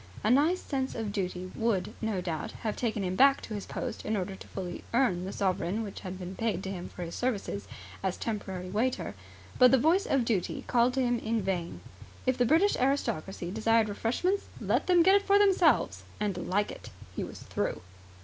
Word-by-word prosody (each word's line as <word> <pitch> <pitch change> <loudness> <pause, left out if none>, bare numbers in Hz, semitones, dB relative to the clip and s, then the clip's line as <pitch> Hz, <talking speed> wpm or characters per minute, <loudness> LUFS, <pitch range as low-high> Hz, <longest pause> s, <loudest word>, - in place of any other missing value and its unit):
A 215 - +3
nice 310 +8 +4
sense 265 -2 -3
of 225 -3 -3
duty 185 -2 -3
would 220 -6 0
no 220 -4 -1
doubt 165 -4 -4
have 215 -2 -1
taken 220 -4 -1
him 185 0 -1
back 275 +5 +6
to 220 - -7
his 205 -2 -5
post - - -4
in 215 0 -1
order 190 0 -3
fully 185 -2 -6
to - - -15
earn 190 -9 +2
the 190 - -4
sovereign 195 +2 0
which 205 - -7
had 185 -1 -6
been 185 0 -6
paid 205 -4 -1
to 190 - -3
him 180 -2 -6
for 180 - -7
his 170 0 -6
services 210 -5 -2 0.3
as 190 -2 -1
temporary 190 -5 -4
waiter; 225 - 0 0.5
but 250 - +9
the 265 - +5
voice 330 +9 +3
of 270 -4 +2
Duty 210 -7 -1
called 245 +1 +3
to 265 - +2
him 245 -1 +1
in 225 -2 -1
vain. 180 -3 -2 0.4
If 255 -1 +3
the 245 - +2
British 330 - +4
aristocracy 195 - -1
desired 220 +1 +2
refreshments 305 - 0
let - - 0
them 355 -2 +6
get 385 +3 +6
them 400 - -14
for 400 0 +6
themselves 340 - +3 0.2
and 205 -3 0
like 205 +3 +1
it! - - -10 0.3
He - - -2
was - - -8
through. - - -2
220 Hz, 205 wpm, -29 LUFS, 190-260 Hz, 0.5 s, but